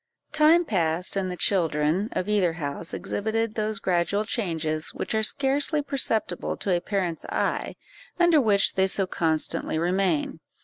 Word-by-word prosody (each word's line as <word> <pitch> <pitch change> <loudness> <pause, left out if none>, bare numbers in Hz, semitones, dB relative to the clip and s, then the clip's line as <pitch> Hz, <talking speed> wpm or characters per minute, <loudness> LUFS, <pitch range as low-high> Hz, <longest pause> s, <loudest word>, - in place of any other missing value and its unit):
Time 325 +3 +4
passed, 175 - 0
and 190 -1 -1
the 180 - -5
children 165 +1 +1
of 185 - -2
either 200 -5 +2
house 160 +1 -5
exhibited 220 +1 -2
those 215 -1 -2
gradual 190 +3 0
changes 160 -8 -2
which - - -4
are 220 - +1
scarcely 280 +6 +2
perceptible 270 -6 -1
to 190 -3 0
a 175 - -1
parent's 180 -4 -2
eye, - - -2 0.4
under 345 -4 +5
which 205 -4 +3
they 190 0 +2
so 195 0 0
constantly 160 -3 -1
remain. 175 -2 0
195 Hz, 145 wpm, -25 LUFS, 170-220 Hz, 0.4 s, under